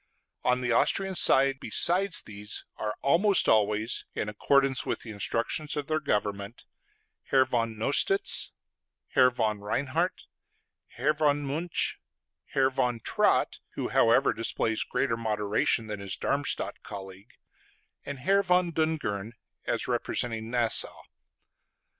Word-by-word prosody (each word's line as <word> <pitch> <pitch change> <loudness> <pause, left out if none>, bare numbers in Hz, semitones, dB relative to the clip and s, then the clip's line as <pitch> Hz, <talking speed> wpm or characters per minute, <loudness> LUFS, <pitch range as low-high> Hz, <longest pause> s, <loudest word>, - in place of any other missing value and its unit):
On 125 0 +1
the 125 -1 -1
Austrian 195 +10 +1
side, 135 -5 +4
besides 185 +5 +3
these, 105 0 -6
are 105 -1 -3
almost 185 +8 +4
always, 110 +1 +1
in 105 - -2
accordance 135 +5 +2
with - - -3
the 115 - -8
instructions 115 +9 -2
of 145 - -2
their 155 +2 -1
governments, 105 -5 -3 0.6
Herr 130 -1 +3
von 115 -3 -2
Nostitz, 145 - +2 0.6
Herr 130 -1 +5
von 110 -4 -1
Reinhard, 140 - -2 0.7
Herr 150 - +2
von 145 -1 +1
Münch, 160 +5 -1 0.5
Herr 135 -1 +1
von 125 -2 -1
Trott - - +1 0.2
(who, - - -3
however, 115 +4 +3
displays 115 0 -1
greater 125 -4 -1
moderation 110 0 0
than 105 -2 -6
his 100 -1 -3
Darmstadt 140 0 -2
colleague), 95 +1 -10 0.7
and 140 0 -6
Herr 195 +7 +3
von 180 -2 +1
Dungern 150 -10 -2 0.3
as - - -1
representing 115 -2 -2
Nassau. 120 -2 +1
125 Hz, 125 wpm, -28 LUFS, 110-145 Hz, 0.7 s, Herr